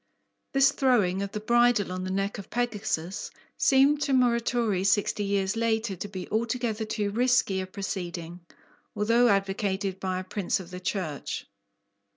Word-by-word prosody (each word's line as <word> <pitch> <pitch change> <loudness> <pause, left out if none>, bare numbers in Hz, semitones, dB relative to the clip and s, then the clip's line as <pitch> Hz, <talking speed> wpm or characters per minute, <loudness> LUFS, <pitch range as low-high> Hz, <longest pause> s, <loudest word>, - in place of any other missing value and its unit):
This 275 0 +5
throwing 215 -10 +2
of 200 0 -3
the 210 - -4
bridle 240 -2 +3
on 185 0 -4
the - - -3
neck 195 +2 -2
of 200 - -10
Pegasus 210 -7 -2 0.3
seemed 280 +2 +4
to 275 - 0
Muratori 235 -5 +2
sixty 205 +1 +2
years 200 0 0
later 225 -2 0
to 195 - -6
be 190 -2 -7
altogether 225 0 -1
too 210 -1 -2
risky 240 -4 +2
a 185 - -5
proceeding 180 -3 -5 0.6
although 230 +4 +3
advocated 195 -1 0
by 185 -1 -2
a - - -5
Prince 190 0 -1
of 185 -1 -10
the 180 - -6
Church! 180 -6 -3
205 Hz, 155 wpm, -27 LUFS, 190-235 Hz, 0.6 s, This